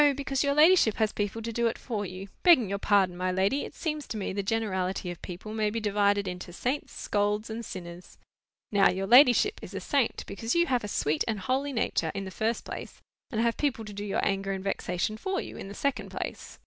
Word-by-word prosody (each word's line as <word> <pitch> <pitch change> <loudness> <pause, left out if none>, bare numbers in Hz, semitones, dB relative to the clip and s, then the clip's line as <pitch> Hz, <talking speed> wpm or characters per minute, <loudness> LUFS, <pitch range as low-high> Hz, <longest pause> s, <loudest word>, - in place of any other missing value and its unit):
because 275 -1 -1
your 280 0 +1
ladyship 310 - +6
has 220 -2 +1
people 205 +2 -3
to 230 0 -4
do 235 +1 +2
it 230 - -2
for 210 -5 -3
you. 185 +2 -8
Begging 330 - +6
your 200 0 -2
pardon, 195 -3 +3
my 185 +1 -1
lady, 195 +10 +1
it - - -10
seems 305 -3 -3
to 220 - -4
me 195 - -3
the 200 - -1
generality 190 -4 -1
of 175 - -10
people 185 +4 -7
may 215 -1 +1
be 225 +2 -2
divided 205 -1 +2
into 180 -1 -6
saints, 255 +10 -2
scolds, 210 +1 -1
and 230 +1 -4
sinners. 175 -3 -9 0.5
Now, 200 -2 +5
your 190 +1 -1
ladyship 250 - +6
is - - -9
a - - -2
saint, 275 -6 0
because 225 +6 -3
you 340 0 +4
have 250 -7 0
a - - -3
sweet 155 -6 0
and 220 -3 -1
holy 265 +7 0
nature, 170 - 0
in 195 0 -3
the 190 - -7
first 225 +4 -1
place; - - -7 0.3
and 220 - -2
have 235 0 +1
people 260 -6 -1
to 210 - -8
do 205 +1 -5
your 205 - -1
anger 195 0 0
and 190 -1 -5
vexation 195 +1 -2
for 380 - -2
you, - - -7
in - - -7
the 200 - -8
second 280 -2 -1
place. - - -6
210 Hz, 230 wpm, -28 LUFS, 195-245 Hz, 0.5 s, ladyship